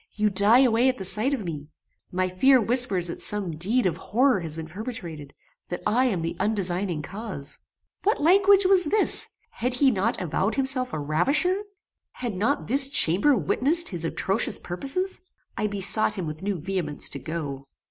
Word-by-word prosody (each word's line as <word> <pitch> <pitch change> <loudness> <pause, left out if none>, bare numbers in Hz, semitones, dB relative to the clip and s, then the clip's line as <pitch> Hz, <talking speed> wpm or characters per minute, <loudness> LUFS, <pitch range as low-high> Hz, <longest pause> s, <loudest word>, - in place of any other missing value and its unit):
You 210 0 0
die 205 +6 +4
away 245 0 +2
at 255 - -3
the 190 - -6
sight 215 +8 0
of 265 -7 -3
me! 150 -4 -7 0.4
My 185 0 -1
fear 255 +9 +3
whispers 230 -6 +3
that 170 - -5
some 195 -6 +2
deed 210 +10 0
of 180 - -1
horror 250 +1 0
has 160 -3 -5
been 160 -1 -7
perpetrated; 165 - -7 0.4
that 175 - -6
I 250 +4 +1
am 190 -10 -2
the 165 - -4
undesigning 185 -5 -2
cause." 190 -7 -7 0.4
What 420 +3 0
language 390 +4 +4
was 370 -2 +3
this? 415 +7 +3 0.2
Had 250 +1 -4
he 270 +1 +3
not 220 +2 -2
avowed 185 +4 -2
himself 265 -2 +2
a - - -4
ravisher? 275 - 0 0.5
Had 240 -4 -5
not 225 +10 -1
this 270 +3 +2
chamber 265 - +5
witnessed 275 - +2
his 175 -4 -2
atrocious 190 +3 0
purposes? 280 - -2 0.3
I 210 - -2
besought 205 +1 +1
him 185 - -4
with 155 0 -7
new 195 -2 -3
vehemence 170 -3 -4
to 140 - -5
go. 145 -4 -7
205 Hz, 175 wpm, -24 LUFS, 175-260 Hz, 0.5 s, chamber